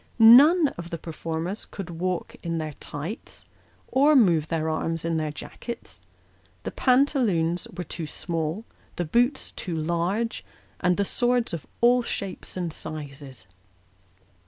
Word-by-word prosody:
None 280 +8 +8
of 170 0 -6
the 170 - -4
performers 165 +4 -4
could 185 -3 -7
walk 180 +2 -3
in 165 -1 -2
their 155 -2 -3
tights, 160 - -7 0.4
or 285 +3 +4
move 170 - +4
their 160 -1 -1
arms 165 +1 -2
in 165 -1 0
their 155 -1 -1
jackets; 145 - -8 0.6
the - - -4
pantaloons 240 - +2
were 180 - -2
too 165 -1 -5
small, 165 +6 -3 0.3
the 175 - -2
boots 245 - +1
too 175 -4 -4
large, 175 +8 -1 0.4
and 180 -1 +2
the 200 - +1
swords 245 -1 +1
of 165 - -5
all 245 +1 +5
shapes 195 -5 -5
and 175 -3 -2
sizes. 140 -8 -7
175 Hz, 135 wpm, -26 LUFS, 160-230 Hz, 0.6 s, None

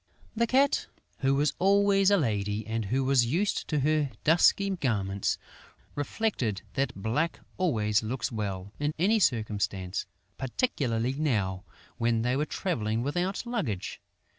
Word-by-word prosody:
The 235 +1 +2
Cat, 270 +3 +3 0.3
who 135 0 +2
was 145 +2 +2
always 195 0 +4
a 200 - +5
lady 105 - -1
and 110 0 -2
who 130 +7 0
was 130 -3 +3
used 180 - 0
to 150 -3 0
her 150 0 +2
dusky 175 +5 +4
garments, 100 - -1 0.6
reflected 145 - -1
that 135 0 -1
black 115 - -1 0.2
always 110 - +2
looks 115 +1 -3
well, 100 -3 -4
in 145 +1 -1
any 205 +7 +3
circumstance, 105 - 0 0.3
particularly 130 - 0
now, 105 -10 -1 0.3
when 115 -1 +1
they 125 +1 +1
were 145 +2 +1
travelling 115 - -1
without 180 - -1
luggage. 200 - -3
130 Hz, 135 wpm, -28 LUFS, 110-175 Hz, 0.6 s, a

